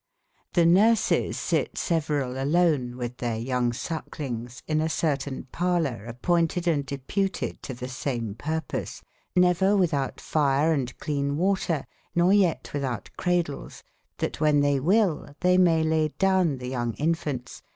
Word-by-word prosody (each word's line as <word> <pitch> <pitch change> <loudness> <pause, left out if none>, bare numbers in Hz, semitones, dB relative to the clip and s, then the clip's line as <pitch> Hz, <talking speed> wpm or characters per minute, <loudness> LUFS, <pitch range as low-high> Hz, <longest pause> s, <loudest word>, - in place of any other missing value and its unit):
F^S 170 -2 +5
nurceis 210 +6 +3
sitte - - -1
severaU 145 -6 -1
alone 145 -5 +2
witb 125 0 -5
tbeyr 115 -2 -3
younge 125 -2 0
suckelinges 125 -6 -5
in 155 -1 +1
a 160 - 0
certain 145 -4 -1
e - - -17
parloure 165 - 0
appointed 170 +7 0
and 145 -5 +1
deputed 175 +9 -2
to 130 - -6
tbe 125 +1 -6
same 120 -4 -3
purpose, 155 +5 -4 0.3
never 180 +2 +4
witboute 155 -9 0
fire 150 +1 +2
and 130 -4 -2
cleane 140 -1 -1
water, 180 -4 0 0.3
nor 175 +2 +4
yet 190 -5 +3
witbou 135 -6 -2
t - - -17
cradels, 175 -5 -2 0.3
tbat - - -1
wben 150 -2 +3
tbey 145 -1 +2
wy 170 +10 +3
II 175 -9 0
tbey 180 0 +4
maye 165 -3 +4
laye 160 -1 +2
downe 185 -7 +2
tbe 125 0 -6
younge 120 -3 -2
infantes, 150 -5 -2
S. - - -18
150 Hz, 150 wpm, -26 LUFS, 130-175 Hz, 0.3 s, F^S